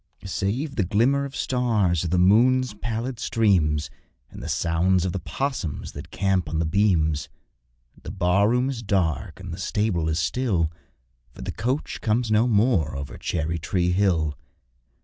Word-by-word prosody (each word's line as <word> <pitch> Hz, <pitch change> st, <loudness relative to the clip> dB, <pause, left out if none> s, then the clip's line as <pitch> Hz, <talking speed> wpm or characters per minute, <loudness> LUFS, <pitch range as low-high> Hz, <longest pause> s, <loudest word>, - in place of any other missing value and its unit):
Save 115 Hz, -, -2 dB
the 105 Hz, -, +3 dB
glimmer 120 Hz, +10 st, +2 dB
of 140 Hz, -, -8 dB
stars, 110 Hz, -, +1 dB
or -, -, 0 dB
the 90 Hz, +2 st, +1 dB
moon's 120 Hz, +6 st, +4 dB
pallid 115 Hz, +3 st, -4 dB
streams, 85 Hz, -10 st, +1 dB, 0.4 s
And -, -, -10 dB
the -, -, -6 dB
sounds 90 Hz, +2 st, +1 dB
of 95 Hz, -, -1 dB
the 95 Hz, -, -3 dB
'possums 115 Hz, -, -3 dB
that 75 Hz, +5 st, -9 dB
camp 95 Hz, -4 st, 0 dB
on 80 Hz, -, -2 dB
the 80 Hz, -, +1 dB
beams, 80 Hz, -4 st, +1 dB, 0.7 s
The -, -, -8 dB
bar 95 Hz, +2 st, +2 dB
room 125 Hz, +2 st, +2 dB
is 130 Hz, -4 st, -3 dB
dark 85 Hz, -, -1 dB
and -, -, -7 dB
the -, -, -7 dB
stable 95 Hz, -7 st, 0 dB
is 80 Hz, -, 0 dB
still, 85 Hz, -2 st, 0 dB, 0.6 s
For -, -, -9 dB
the -, -, -3 dB
coach 130 Hz, +5 st, -3 dB
comes 115 Hz, +1 st, 0 dB
no 110 Hz, +3 st, +4 dB
more 105 Hz, -, +2 dB
over 70 Hz, 0 st, -6 dB
Cherry 80 Hz, 0 st, -2 dB
tree 90 Hz, +2 st, 0 dB
Hill. 90 Hz, -6 st, +1 dB
95 Hz, 165 wpm, -24 LUFS, 85-115 Hz, 0.7 s, moon's